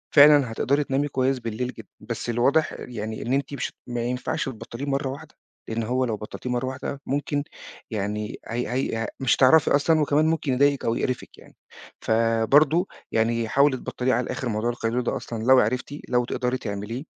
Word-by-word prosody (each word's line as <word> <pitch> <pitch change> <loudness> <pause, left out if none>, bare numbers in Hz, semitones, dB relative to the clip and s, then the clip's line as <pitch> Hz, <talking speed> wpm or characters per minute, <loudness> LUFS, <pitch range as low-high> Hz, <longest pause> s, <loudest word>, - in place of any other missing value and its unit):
فعلًا 145 -4 +7
هتقدري 140 +6 +1
تنامي 140 +2 0
كويس 130 -1 0
بالليل 115 +1 -3
جدًا، 110 -3 -12
بس 115 0 -5
الواضح 135 +7 +2
يعني 110 -2 -5
إن 125 - -2
أنتِ 140 +1 -1
مش 140 - -3
ما 120 -1 -3
ينفعش 125 +1 -2
تبطليه 130 +1 -6
مَرّة 135 -1 -1
واحدة، 150 +3 -9 0.3
لأن 115 0 -2
هو 125 +3 0
لو 110 -3 -2
بطلتيه 110 +4 -7
مَرّة 125 +1 -1
واحدة 135 +1 -5
مُمكن 145 +1 -1 0.5
يعني 105 0 -3
هي 120 +1 -2
هي 130 -3 -1
آآ، 115 -1 -2
مش 130 - +3
هتعرفي 140 +4 +5
أصلًا 155 +3 +3
وكمان 150 +1 +3
مُمكن 160 -4 0
يضايقِك 140 +2 +2
أو 115 - +1
يقرفِك 130 -2 -3
يعني، - - -17 0.5
فبرضو 115 - +3 0.2
يعني 115 0 +1
حاولي 140 -1 +3
تبطليه 130 +1 -1
على 125 +2 +1
الآخر 125 0 -3
موضوع 110 +2 -1
القيلولة 120 +1 -1
ده - - -1
أصلًا 115 -2 -6
لو 130 +1 +6
عرفتِ 130 +6 -1
لو 125 -1 +2
تقدري 125 +1 -1
تعمليه، 105 +3 -5
125 Hz, 180 wpm, -25 LUFS, 115-140 Hz, 0.5 s, فعلًا